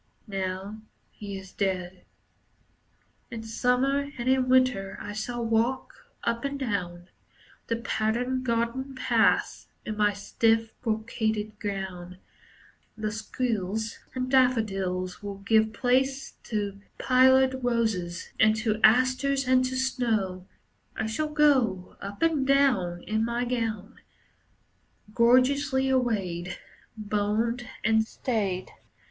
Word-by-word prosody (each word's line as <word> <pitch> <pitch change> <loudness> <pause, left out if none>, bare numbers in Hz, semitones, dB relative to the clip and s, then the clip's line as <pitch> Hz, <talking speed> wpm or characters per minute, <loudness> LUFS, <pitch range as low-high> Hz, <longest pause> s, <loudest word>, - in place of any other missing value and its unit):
Now 195 +1 -4 0.3
he 200 -2 -7
is 190 0 -11
dead. 185 -2 -3 1.2
In 225 -2 -6
Summer 260 +5 +1
and 240 +1 -4
in 260 -1 +2
Winter 255 -7 +2
I 205 - -6
shall 235 +3 -3
walk 230 - 0 0.3
Up 235 0 -1
and 280 0 -2
down 185 -8 -3 0.6
The 230 - 0
patterned 235 +3 -1
garden 240 +3 -1
paths 240 -3 +1 0.2
In 215 - -3
my 210 -1 +3
stiff, 225 +2 +1
brocaded 220 -2 -2
gown. 185 -3 -5 0.8
The 215 -1 -2
squills 220 -1 -3 0.2
and 255 0 -1
daffodils 195 -8 +1
Will 200 -1 -6
give 220 +2 +2
place 265 +4 0
to 205 -3 -3 0.2
pillared 260 0 +4
roses, 220 -8 -1
and 215 -1 +5
to 215 -1 -1
asters, 255 +4 +3
and 255 0 +4
to 255 0 -3
snow. 220 -8 -1 0.5
I - - -2
shall 265 +8 -2
go 260 -12 +2
Up 200 +8 -5
and 310 -5 +2
down, 225 -12 +2
In 220 +1 -1
my 235 +1 -1
gown. 230 -5 -3 1.1
Gorgeously 265 +3 +3
arrayed, 195 -9 -1 0.4
Boned 215 +3 -1 0.2
and 220 0 +3
stayed. 205 -5 -2
225 Hz, 110 wpm, -27 LUFS, 205-255 Hz, 1.2 s, and